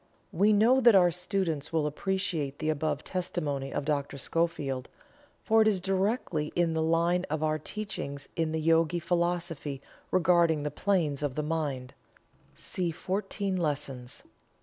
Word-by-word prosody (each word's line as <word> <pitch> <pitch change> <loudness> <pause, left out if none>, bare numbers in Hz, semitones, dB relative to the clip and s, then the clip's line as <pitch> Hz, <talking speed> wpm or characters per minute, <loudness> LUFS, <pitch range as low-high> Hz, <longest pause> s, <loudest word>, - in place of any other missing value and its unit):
We 200 +5 +3
know 230 +6 +5
that 235 -4 +7
our 180 -2 +6
students 180 -4 -2
will 160 -2 +1
appreciate 160 -3 -2
the 155 - -2
above 150 -1 -2
testimony 150 -7 -3
of 140 - -2
Dr. 145 -2 -1
Schofield, 140 -4 -1 0.5
for 225 0 +4
it 220 - +4
is 205 -3 +3
directly 190 -4 -1
in 170 -2 +2
the 160 - 0
line 170 +2 +2
of 155 0 -1
our 155 0 +1
teachings 150 -7 -5
in 165 -1 0
the 160 - -1
Yogi 165 +1 +3
Philosophy 170 -4 -1 0.3
regarding 170 -4 +3
the 150 - -2
Planes 160 -5 0
of 145 -3 -2
the 150 - -1
Mind 145 -5 -3 0.6
(see 180 -2 -2
"Fourteen 195 +3 -2
Lessons"). 140 -6 -3
165 Hz, 150 wpm, -29 LUFS, 150-185 Hz, 0.6 s, that